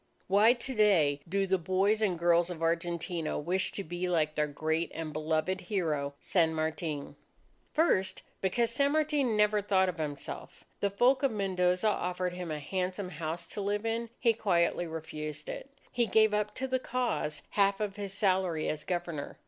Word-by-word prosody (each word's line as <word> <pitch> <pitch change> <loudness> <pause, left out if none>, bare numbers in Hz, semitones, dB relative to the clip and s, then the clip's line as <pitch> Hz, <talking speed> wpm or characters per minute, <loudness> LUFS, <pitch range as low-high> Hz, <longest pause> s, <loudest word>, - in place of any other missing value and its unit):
Why, 205 +5 +5
to 255 +2 -6
day, 170 - +3
do 195 +2 +1
the 190 0 +1
boys 195 +5 +2
and 190 -5 +1
girls 170 +1 +3
of 165 -2 -5
Argentina 170 0 -1
wish 180 +5 0
to 200 - -4
be 175 +1 -3
like 155 -3 +1
their 150 0 +1
great 160 +3 -1
and 160 -2 -4
beloved 155 +5 -1
hero 155 -7 -1
San 165 -3 +2
Martin? 155 -2 -3 0.6
First, 300 - +2 0.2
because 230 +5 +1
San 280 +4 +2
Martin 295 -7 +1
never 210 0 +3
thought 190 -2 +2
of 175 -2 -6
himself. 145 -2 -5 0.2
The 200 - +1
folk 245 +7 +3
of 275 - +3
Mendoza 185 -1 +1
offered 180 -3 -1
him 180 -1 -5
a 155 - -2
handsome 185 +5 -3
house 165 +1 -4
to 205 - -5
live 205 +2 -1
in. 230 +1 -1
He 230 -2 +3
quietly 175 -5 +1
refused 155 -2 -6
it. - - -6 0.2
He 240 -1 +1
gave 220 +1 +4
up 210 0 0
to 265 - -2
the 260 0 0
cause 240 -13 -2
half 200 -1 +2
of 205 -2 -3
his 200 -2 -4
salary 185 -5 +1
as 155 0 -3
Governor. 175 -5 -4
185 Hz, 175 wpm, -30 LUFS, 160-210 Hz, 0.6 s, Why